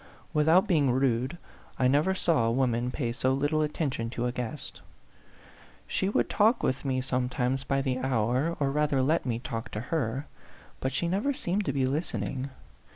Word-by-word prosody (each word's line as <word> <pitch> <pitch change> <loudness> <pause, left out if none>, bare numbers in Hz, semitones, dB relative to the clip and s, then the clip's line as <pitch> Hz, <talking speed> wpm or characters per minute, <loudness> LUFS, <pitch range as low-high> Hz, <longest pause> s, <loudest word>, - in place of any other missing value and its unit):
Without 160 +6 +5
being 150 -8 +3
rude, 130 +3 +1 0.4
I 130 - +3
never 150 +8 +3
saw 160 -11 +2
a - - +2
woman 120 -1 +1
pay 125 -2 -2
so 130 +2 +1
little 145 +3 +1
attention 145 -6 -1
to 120 0 -3
a 125 - 0
guest; 125 +3 -6 1.0
she 190 - -1
would - - +1
talk 220 +3 +3
with 130 - 0
me 130 -2 0
sometimes 125 0 -1
by 135 0 0
the 130 -2 -1
hour, 130 +5 0
or 140 -2 +1
rather 145 -2 +2
let 155 0 +1
me 115 -2 0
talk 120 -3 -5
to 105 - -2
her, 130 +1 -2 0.5
but 130 - -1
she 140 +6 -1
never 205 +11 0
seemed 200 -6 -1
to 140 - +1
be 135 -1 +1
listening. 130 - -2
135 Hz, 175 wpm, -28 LUFS, 125-155 Hz, 1.0 s, Without